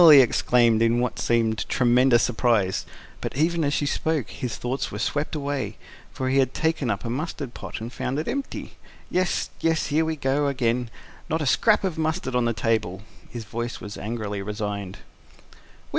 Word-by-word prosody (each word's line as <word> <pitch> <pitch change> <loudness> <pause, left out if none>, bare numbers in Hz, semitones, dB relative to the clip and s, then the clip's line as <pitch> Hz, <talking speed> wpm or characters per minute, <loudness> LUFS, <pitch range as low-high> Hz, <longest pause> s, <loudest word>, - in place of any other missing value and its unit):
he 145 -2 +11
exclaimed, 120 -2 +4
in 115 +1 +3
what 125 0 -1
seemed 115 -2 +1
tremendous 125 0 +4
surprise; 110 -6 +1 0.3
but, - - -4
even 165 +2 +2
as 145 - +1
she 145 - 0
spoke, 155 -2 -1
his 125 -3 -4
thoughts 125 +3 -2
were - - -5
swept 150 +2 -1
away; 145 -2 -3 0.3
for 130 - -3
he 135 +1 +3
had 130 -1 +1
taken 160 -5 0
up 100 +1 -2
a - - -2
mustard 140 -1 -4
pot - - -6
and 115 +3 -6
found 130 +3 -2
it 155 - -2
empty. 280 0 -4 0.3
"Yes, 185 -1 0
yes, 160 -1 +1
here 160 +2 +4
we 160 0 -2
are 140 +2 +2
again! 125 -2 0 0.4
Not 160 0 0
a - - -1
scrap 210 - +4
of 180 -4 -2
mustard 160 -4 -1
on 125 -1 +2
the 115 - +2
table. 110 -4 -1
" - - -23
His 120 -2 -6
voice 120 +3 -4
was 100 0 -7
angrily 105 -2 -4
resigned. 105 -2 -4
125 Hz, 185 wpm, -25 LUFS, 115-150 Hz, 0.4 s, he